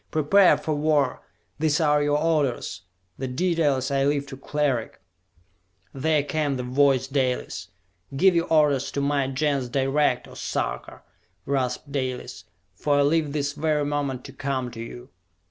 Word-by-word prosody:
Prepare 180 +6 +4
for 155 - -2
war! 145 -3 +1 0.4
These 155 -1 +2
are 150 -2 +3
your 145 0 +2
orders; 150 - 0 0.4
the 130 - -2
details 145 -2 0
I 135 0 +2
leave 140 0 +1
to 135 - -7
Cleric!" 135 -3 -2 0.9
There 150 +2 +1
came 145 -2 -1
the 125 - -3
voice 130 +1 +2
Dalis. 125 -10 -2 0.5
"Give 190 +4 +5
your 170 0 +1
orders 145 -4 +3
to - - -1
my 140 -1 +1
Gens 135 -1 -1
direct, 135 +3 +1
O - - -13
Sarka!" - - -4 0.4
rasped 135 0 -2
Dalis. 130 -3 -4 0.3
"For 145 +9 0
I - - +4
leave 150 0 +1
this 140 -1 -1
very 150 -1 0
moment 140 -3 -2
to - - -10
come 130 -3 -3
to 115 - -10
you!" 120 +2 -8
140 Hz, 150 wpm, -25 LUFS, 130-150 Hz, 0.9 s, Give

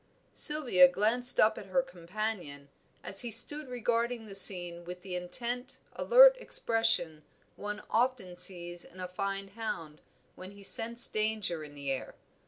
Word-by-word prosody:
Sylvia 255 -12 +4
glanced 220 +7 +3
up 220 +1 +3
at 200 - -11
her 260 +8 +1
companion, 175 - -6 0.3
as 195 - -1
he 240 - -4
stood 265 +6 +3
regarding 235 -1 -2
the 205 - -10
scene 175 -3 +3
with 180 +1 -10
the 190 -2 -8
intent, 245 +8 -3 0.2
alert - - +6
expression 225 - -1 0.3
one 210 +1 -7
often 230 -6 -1
sees 175 -1 -3
in 185 - -16
a 180 - -5
fine 195 +2 -5
hound 170 -8 -7 0.3
when 185 +2 -11
he 200 0 -15
scents 235 +4 +2
danger 215 -6 -3
in 145 -1 -12
the 140 -1 -5
air. 135 - -5
200 Hz, 150 wpm, -30 LUFS, 180-235 Hz, 0.3 s, alert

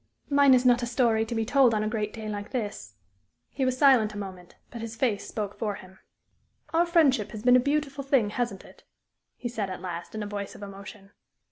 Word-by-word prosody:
"Mine 280 -2 +6
is 250 0 +1
not 245 -1 +5
a 240 - -2
story 235 -2 +1
to 235 - -4
be 225 0 0
told 250 -2 +4
on 210 - 0
a - - -1
great 215 -1 -2
day 220 0 -7
like 205 -1 -5
this." 205 - -5 0.6
He 270 - -1
was 255 0 0
silent 250 -7 +4
a - - -5
moment, 185 -3 -8 0.2
but 235 - -7
his 225 0 -6
face 225 -4 -1
spoke 205 -2 -4
for 210 -3 -2
him. 190 0 -14 0.7
"Our 340 +1 +3
friendship 275 - +3
has 215 0 -7
been 250 0 +6
a - - +7
beautiful 285 +1 -1
thing, 260 -7 +2
hasn't 235 -4 -3
it?" - - -17 0.5
he 245 - -4
said, 220 -5 -3
at 185 - -6
last, 175 +1 -6
in 215 - -3
a - - -4
voice 205 -1 -5
of - - -10
emotion. 200 0 -10
220 Hz, 225 wpm, -27 LUFS, 205-255 Hz, 0.7 s, a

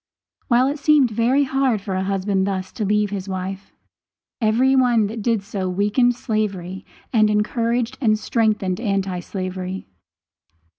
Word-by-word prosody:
While 245 0 +4
it 285 +2 -2
seemed 290 -5 +4
very 240 +6 +2
hard 265 -4 +1
for 195 0 -5
a 185 - 0
husband 195 0 0
thus 190 -1 -3
to 220 - -4
leave 210 0 +1
his 195 -1 -4
wife, 190 +1 -5 0.7
every 240 +5 +3
one 245 -4 +3
that 220 +2 -5
did 225 -2 0
so 195 -2 -3
weakened 210 +6 +2
slavery 195 -5 -3 0.3
and 215 -2 +4
encouraged 230 +3 0
and 215 -4 +3
strengthened 215 -4 0
anti 195 -5 -1
slavery. 185 +1 -5
210 Hz, 145 wpm, -21 LUFS, 190-235 Hz, 0.7 s, While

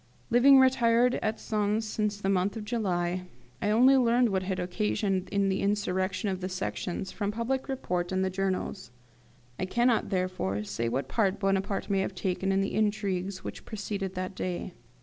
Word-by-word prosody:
Living 265 +4 +7
retired 250 -2 +4
at 220 +1 -1
Sens 215 +1 0
since 210 -1 -1
the 195 - -2
month 195 +2 +1
of 215 - -6
July, 180 -5 -1 0.3
I 205 - +1
only 250 +5 +6
learned 240 -1 +4
what 190 -2 0
had 185 0 -2
occasioned 190 +1 -1
the 195 -1 0
insurrection 190 -1 0
of 190 -1 -2
the 185 - -3
Sections 185 0 -3
from 205 -2 -2
public 245 +5 -2
report 180 -9 -2
and 190 0 +1
the 190 - -1
journals. 190 0 -2 0.7
I 185 - 0
cannot, 240 +4 +2
therefore, 180 - -1
say 105 +3 -2
what 130 +3 -2
part 200 - +1
Bonaparte 195 0 0
may 195 -1 +1
have 190 0 -2
taken 185 +1 -1
in 195 0 +2
the 195 - -2
intrigues 200 -3 -1
which - - -7
preceded 200 -3 -4
that 185 +1 -3
day. 180 -1 -4
195 Hz, 170 wpm, -28 LUFS, 185-215 Hz, 0.7 s, Living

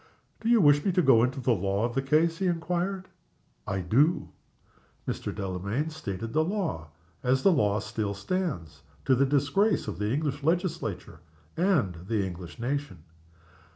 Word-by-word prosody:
"Do 225 - -2
you 235 -1 +6
wish 145 -2 +5
me 195 - +2
to 180 - +3
go 120 -6 +6
into 125 +3 0
the 125 -1 +1
law 100 +2 0
of 120 - -3
the 135 - +1
case?" 160 +5 +2
he 190 - +1
inquired. 180 +3 -1 0.6
"I 95 -1 -1
do." 135 - +2 0.8
Mr. - - -3
Delamayn 100 - -3
stated 115 -8 -5
the 155 - +3
law, 170 - -2 0.3
as 130 +1 +1
that 195 - +6
law 105 - +2
still 110 -1 -3
stands 100 - -3 0.2
to - - +4
the 135 +2 +3
disgrace 145 - +2
of 100 -4 -5
the 105 +1 -1
English 145 +1 -1
Legislature 165 - -2 0.4
and 160 - +2
the 105 -3 0
English 90 0 -8
Nation. 130 - -3
135 Hz, 160 wpm, -28 LUFS, 100-165 Hz, 0.8 s, you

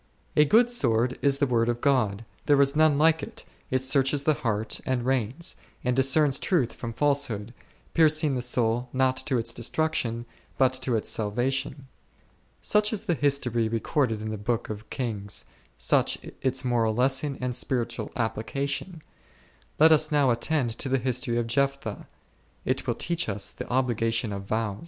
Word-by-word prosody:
A 150 - +6
good 235 +9 +4
sword 120 - +1
is 140 -1 +3
the 140 - +2
word 120 -3 +1
of 120 0 -1
God, 115 -6 +1 0.2
there 145 -1 +5
is 140 +1 +3
none 155 -2 +4
like 160 +1 +4
it; - - -8 0.2
it 130 0 0
searches 135 +1 +2
the 155 - +3
heart 110 -5 -2
and 125 -2 -1
reins, 130 +4 0 0.3
and 125 -1 0
discerns 135 +2 +3
truth 140 -11 0
from 115 - -6
falsehood, 120 -5 0 0.4
piercing 155 -2 +3
the 125 - -1
soul 120 0 0
not 130 0 +2
to 135 -4 +1
its 115 0 -2
destruction 120 -2 -1 0.3
but 130 -1 +3
to 125 -3 0
its 110 - -1
salvation. 130 +6 -1 0.8
Such 210 0 +2
is 220 - -2
the 175 - +1
history 125 -6 0
recorded 115 0 -1
in 110 - -4
the 110 - -5
Book 110 +1 -2
of 105 +1 -8
Kings, 105 -5 -3 0.3
such - - +2 0.2
its 130 0 0
moral 115 -3 +1
lesson 135 +3 +1
and 125 -1 -2
spiritual 120 -3 -2
application. 140 - -3 0.7
Let 160 +2 +6
us 155 0 +4
now 145 -4 +3
attend 120 +1 0
to 135 - 0
the 135 - +2
history 125 -1 -1
of 120 - 0
Jephthah: 135 -2 -2 0.6
it - - -1
will - - 0
teach 170 -7 -1
us 100 0 -2
the - - -8
obligation 115 -3 0
of 100 0 -6
vows. 105 -1 -2
130 Hz, 165 wpm, -26 LUFS, 115-140 Hz, 0.8 s, A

